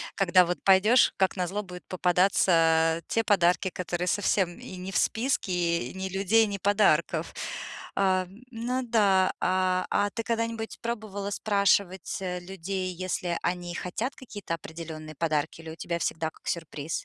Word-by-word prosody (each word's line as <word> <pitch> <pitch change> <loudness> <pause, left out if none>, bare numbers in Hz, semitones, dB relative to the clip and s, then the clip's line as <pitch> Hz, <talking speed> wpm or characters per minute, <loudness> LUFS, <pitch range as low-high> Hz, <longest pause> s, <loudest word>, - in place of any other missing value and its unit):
когда 185 -2 +5
вот 175 +1 -3
пойдёшь, 200 +6 +5
как 190 0 +2
на 180 -1 0
зло 205 +4 -3
будет 180 -2 -10
попадаться, 185 +1 +2 0.5
э, - - -15
те 225 - +1
подарки, 190 -2 +3
которые 180 0 -3
совсем 185 -2 +1
и - - -9
не 185 +1 -6
в - - 0
списке, 230 -4 0 0.4
и - - -9
ни 190 0 -4
людей, 200 +4 +3
ни 200 -1 -3
подарков. 205 +2 +2 0.6
А, 185 -2 +2 0.2
ну 250 +3 -2
да. 200 -5 +3
А, 185 0 +1
а 205 - +2
ты 230 - -3
когда-нибудь 230 -1 -2
пробовала 215 -4 -4
спрашивать, 200 -3 +1
э, 180 -1 -3
людей, 185 +1 -4
если 175 -1 -2
они 175 -1 -2
хотят 220 +10 -3
какие-то 205 -9 -7
определённые 160 -1 -7
подарки, 155 0 -1
или 160 -1 -8
у - - -8
тебя 170 +1 -3
всегда 160 -1 -2
как - - -19
сюрприз? 160 -2 -3
185 Hz, 160 wpm, -27 LUFS, 175-205 Hz, 0.6 s, когда